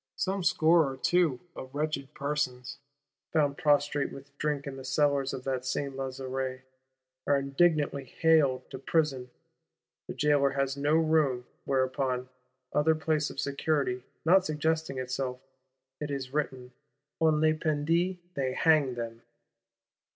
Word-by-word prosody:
"Some 190 0 -1
score 165 -4 +4
or 135 - -8
two" 165 -3 +2
of 130 +1 -9
wretched 145 -2 -2
persons, 140 -3 -2 0.5
found 145 -3 +2
prostrate 145 -1 +2
with 140 +1 -12
drink 150 -2 -1
in 140 -1 -5
the 135 - -8
cellars 140 0 +1
of 130 - -6
that 130 -2 -2
Saint 135 +1 -2
Lazare, 130 -1 -4 0.6
are 140 - +4
indignantly 140 0 +1
haled 145 -1 +2
to 130 - -6
prison; 135 -4 0 0.8
the - - -6
Jailor 145 -2 +3
has 135 0 0
no 145 +2 +1
room; 155 -6 +2 0.2
whereupon, 130 -1 0 0.4
other 160 +2 +3
place 155 -1 0
of - - -8
security 140 -3 0 0.2
not 185 +3 +6
suggesting 160 -3 -1
itself, 130 0 -3 0.6
it 150 - -4
is 135 -2 -4
written, 130 -4 -2 0.5
"on 155 -2 +3
les 155 0 +4
pendit, 165 +4 0 0.2
they 130 -4 -1
hanged 150 -6 +3
them." 115 -1 -6
140 Hz, 135 wpm, -29 LUFS, 130-155 Hz, 0.8 s, not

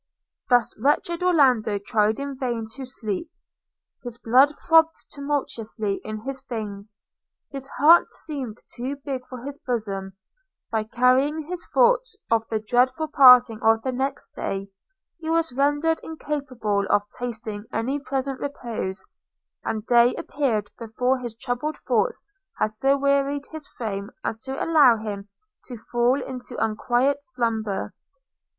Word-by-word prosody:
Thus 245 -3 +3
wretched 335 +6 +1
Orlando 255 - +3
tried 210 +2 +1
in 280 0 -4
vain 240 -4 -3
to 260 +3 -8
sleep 240 - -3 0.4
– - - -54
his 240 -2 -7
blood 255 +4 +5 0.2
throbbed 325 0 +6 0.2
tumultuously 235 -8 -3
in 215 0 -5
his 270 +2 -6
veins; 210 -2 -5 0.5
his 270 -1 -6
heart 320 +5 +6
seemed 260 -8 -6
too 255 +3 -3
big 275 -2 -5
for 250 -2 -9
his 280 +1 -6
bosom; 200 -6 -3 0.6
by 220 -1 0
carrying 255 +7 +2
his 345 +3 -6
thoughts - - +3 0.2
of 225 -1 +2
the 220 - 0
dreadful 255 +7 +1
parting 250 -6 +7
of 225 0 +3
the 260 - -1
next 270 +2 -3
day, 195 0 -4 0.5
he 320 -1 -5
was 330 -4 +1
rendered 290 +4 +2
incapable 265 -10 -2
of 205 - +3 0.2
tasting 220 -3 -5
any 255 +6 -1
present 270 -1 -3
repose; 230 -9 -4 0.6
and 215 -1 -3
day 240 +1 +5
appeared 225 -8 -1
before 250 +3 0
his 240 -3 -6
troubled 250 +5 -3
thoughts - - 0 0.3
had 215 - +1
so 270 +6 +2
wearied 280 0 +1
his 315 -2 -8
frame 200 -3 -5
as 220 - -3
to 265 +4 -4
allow 290 -8 +6
him 205 -2 -6 0.4
to 245 - -8
fall 240 +4 +1
into 250 -1 -7
unquiet 240 +5 +1
slumber. 230 -6 -2
250 Hz, 140 wpm, -24 LUFS, 220-280 Hz, 0.6 s, parting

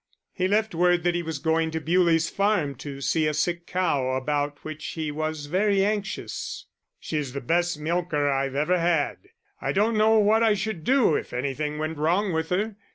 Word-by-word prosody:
He 185 -1 0
left 215 +1 +1
word 175 0 +3
that 175 0 +2
he 175 - -1
was 160 -2 -4
going 160 +2 +1
to 160 0 -3
Bewlie's 165 0 +2
Farm 200 -8 +1
to 140 +1 -7
see 155 +3 +1
a 150 - -1
sick 170 +3 -1
cow, 145 -8 0
about 145 +2 -1
which 155 0 -7
he 155 -2 -3
was 155 0 -3
very 195 +5 +2
anxious. 205 -2 -3 0.3
"She's 145 -5 -3
the 140 - -3
best 170 +4 0
milker 155 -2 0
I've 135 -1 0
ever 165 +6 +2
had. 165 -3 +1 0.4
I - - -1
don't 215 +4 +2
know 220 +1 +4
what 215 +1 +4
I 220 -2 +4
should 195 -4 -3
do 255 - +3
if - - -3
anything 140 +4 -2
went 155 0 -3
wrong 180 +5 +1
with 160 0 -1
her. 205 +3 -1
165 Hz, 190 wpm, -25 LUFS, 150-190 Hz, 0.4 s, know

